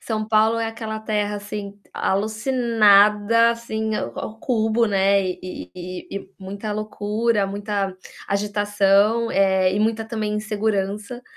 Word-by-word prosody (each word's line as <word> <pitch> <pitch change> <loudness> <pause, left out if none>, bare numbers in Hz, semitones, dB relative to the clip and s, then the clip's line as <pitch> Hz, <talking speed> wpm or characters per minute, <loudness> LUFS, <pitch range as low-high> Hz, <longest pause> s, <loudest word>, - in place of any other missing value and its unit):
São 215 -2 -3
Paulo 220 +1 +3
é 230 - -1
aquela 220 -1 -5
terra, 210 -1 -2
assim, 205 0 -7
alucinada, 215 0 +3
assim, 220 -2 -3
ao 215 - -5
cubo, 225 -1 +1
né, 200 -1 +3
e 185 0 -6
e 185 0 -8
e 200 -1 -6
muita 200 +2 -6
loucura, 215 0 -1
muita 200 -1 -3 0.3
agitação, 205 +2 +2
eh, 190 -2 +3
e 200 - 0
muita, 225 +1 0
também, 220 -2 -3
insegurança. 210 +2 -2
210 Hz, 120 wpm, -22 LUFS, 200-220 Hz, 0.3 s, Paulo